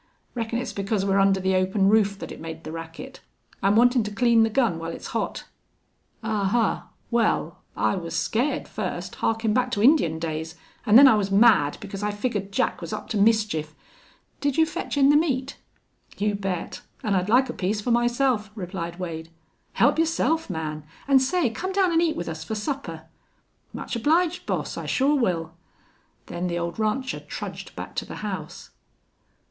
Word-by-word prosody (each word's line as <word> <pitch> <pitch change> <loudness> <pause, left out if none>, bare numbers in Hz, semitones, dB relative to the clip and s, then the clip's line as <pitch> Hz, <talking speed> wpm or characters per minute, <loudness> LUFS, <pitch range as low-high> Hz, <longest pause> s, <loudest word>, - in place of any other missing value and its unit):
Reckon 230 -1 -2
it's 250 +1 -4
because 200 0 -1
we're 195 0 +2
under 195 0 +4
the 190 0 +1
open 190 +1 +2
roof 205 -1 +3
that - - -8
it - - -9
made 160 0 -7
the 155 - -7
racket. 165 0 -8 0.4
I'm 200 +2 +3
wantin' 245 +2 +5
to 210 - -4
clean 230 +2 +4
the 225 - +4
gun 220 -8 +1
while 165 0 -5
it's 165 - -7
hot." - - -2 0.8
"Ahuh! 210 -3 0 0.3
Wal, 235 -2 0 0.2
I - - +1
was 170 -2 -5
scared 245 +7 0
fust, - - -4
harkin' 225 -1 0
back 255 +2 +1
to 205 -3 -1
Indian 245 - +4
days, 160 0 -4 0.3
an' 210 - +5
then 275 +3 +10
I 265 - +7
was 205 -2 +1
mad 200 -8 +5
because 195 0 -7
I 210 - 0
figgered 205 -2 -3
Jack 195 - 0
was 170 - -6
up - - -5
to 220 - -1
mischief.... 200 -8 +2 0.6
Did 285 -2 -1
you 320 - +5
fetch 320 -2 -4
in 275 0 +5
the 290 - +6
meat?" 275 -4 0 0.6
"You 210 0 0
bet. 195 -3 -4 0.2
An' 210 - 0
I'd 185 +1 0
like 255 +4 +4
a 245 - -5
piece 205 +3 -1
for 240 +4 -2
myself," 240 -2 +1
replied 175 -3 -5
Wade. 165 -3 -5 0.4
"Help - - +3
yourself, 325 -1 +1
man. 155 -3 -4 0.2
An' 275 -1 +6
say, 265 -1 +1
come 370 - -4
down 380 -2 +3
an' 330 0 +3
eat 330 -2 +1
with 175 - -4
us 160 0 -5
fer 220 - -4
supper." 210 - -4 0.7
"Much - - -5
obliged, 325 +8 +1
boss. - - -2
I - - -5
sure 280 +2 +2
will." 170 - 0 0.7
Then 180 +1 -4
the 175 -1 -2
old 170 +3 -4
rancher 255 +5 -1
trudged - - -7
back - - -7
to - - -1
the - - -8
house. - - -6
210 Hz, 185 wpm, -25 LUFS, 180-250 Hz, 0.8 s, then